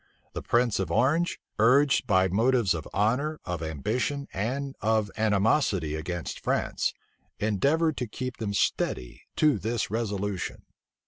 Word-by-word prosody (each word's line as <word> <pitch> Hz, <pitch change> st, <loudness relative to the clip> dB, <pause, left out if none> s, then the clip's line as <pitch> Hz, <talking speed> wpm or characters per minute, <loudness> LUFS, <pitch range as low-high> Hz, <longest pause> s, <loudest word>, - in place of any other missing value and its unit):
The -, -, -4 dB
prince 120 Hz, -3 st, +1 dB
of 95 Hz, -4 st, -1 dB
Orange, 145 Hz, -, +2 dB, 0.2 s
urged 130 Hz, +4 st, +4 dB
by 95 Hz, -3 st, +4 dB
motives 115 Hz, +2 st, +2 dB
of 80 Hz, -2 st, -5 dB
honor, 125 Hz, +10 st, 0 dB
of 90 Hz, -2 st, -3 dB
ambition, 110 Hz, -, -2 dB
and 135 Hz, +7 st, -2 dB
of 110 Hz, -2 st, +1 dB
animosity 105 Hz, -, +2 dB
against 85 Hz, +2 st, -4 dB
France, -, -, 0 dB, 0.5 s
endeavored 140 Hz, -, +1 dB
to 125 Hz, -, -2 dB
keep 125 Hz, +3 st, -5 dB
them 100 Hz, -3 st, -3 dB
steady -, -, -1 dB
to 150 Hz, -8 st, +3 dB
this 115 Hz, 0 st, -2 dB
resolution. 105 Hz, -4 st, -3 dB
110 Hz, 130 wpm, -27 LUFS, 95-130 Hz, 0.5 s, urged